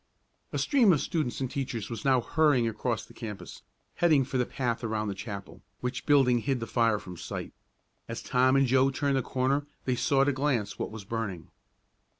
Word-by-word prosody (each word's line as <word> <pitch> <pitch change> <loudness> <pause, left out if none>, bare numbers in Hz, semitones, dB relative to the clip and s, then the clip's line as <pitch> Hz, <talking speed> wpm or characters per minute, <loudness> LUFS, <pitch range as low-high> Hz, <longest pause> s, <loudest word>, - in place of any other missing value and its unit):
A - - -2
stream 250 -9 +4
of 150 - +2
students 145 -6 -2
and 130 -1 -2
teachers 125 -6 -3
was 115 - -5
now 130 -3 +4
hurrying 145 -3 +3
across 115 +1 -2
the - - -17
campus, 105 -4 -8 0.4
heading 155 -6 +4
for 130 0 -2
the 125 - +1
path 120 -3 -2
around 110 -2 -1
the - - -2
chapel, 100 -1 -8 0.2
which 125 +1 -4
building 135 -4 +5
hid 135 +2 -1
the 115 - -3
fire 115 -2 +2
from 90 -3 -9
sight. - - -6 0.5
As 115 0 -6
Tom 130 +1 +3
and 135 0 +5
Joe 130 +1 +4
turned 140 +1 0
the - - +2
corner 135 +3 0 0.2
they 130 - +1
saw 135 +2 +2
at 135 - +3
a - - +1
glance 130 -7 -1
what - - -2
was 110 -2 -9
burning. 100 -6 -4
125 Hz, 200 wpm, -28 LUFS, 115-135 Hz, 0.5 s, building